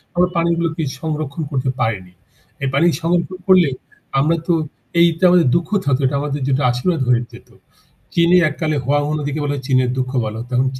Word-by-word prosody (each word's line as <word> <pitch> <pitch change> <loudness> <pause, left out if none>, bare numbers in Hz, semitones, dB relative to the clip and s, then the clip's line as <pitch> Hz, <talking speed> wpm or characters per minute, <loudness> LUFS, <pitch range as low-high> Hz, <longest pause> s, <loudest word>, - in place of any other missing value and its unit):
আমরা 180 +1 +3
পানিগুলোকে 170 -1 0 0.2
সংরক্ষণ 155 -1 -3
করতে 130 -2 -1
পারিনি। 95 -5 -2 0.5
এই 135 - +1
পানি 140 +5 +3 0.2
সংরক্ষণ 175 +2 -1
করলে 185 -5 +5 0.5
আমরা 155 +4 +2
তো 175 - +3 0.5
এটা 170 +1 +2
আমাদের 175 -4 +4
দুঃখ 170 -1 0 0.2
থাকত 140 -2 +2
না - - +1
এটা 140 +2 -1
আমাদের 145 0 -3
যেটা 140 +1 +1
আশীর্বাদ 145 +6 -1
হয়ে 120 -1 +3
যেত। - - -14 0.7
চীনে 170 +1 +5
এক 150 - -8
কালে 155 -2 0
'Huang 145 +3 +1
He' 155 - -1
নদীকে 145 +1 -3
বলা 145 0 -1
হতো 135 - -7
চীনের 130 -2 +2
দুঃখ। 130 0 -2 0.3
এখন 125 +1 0
145 Hz, 185 wpm, -19 LUFS, 130-170 Hz, 0.7 s, করলে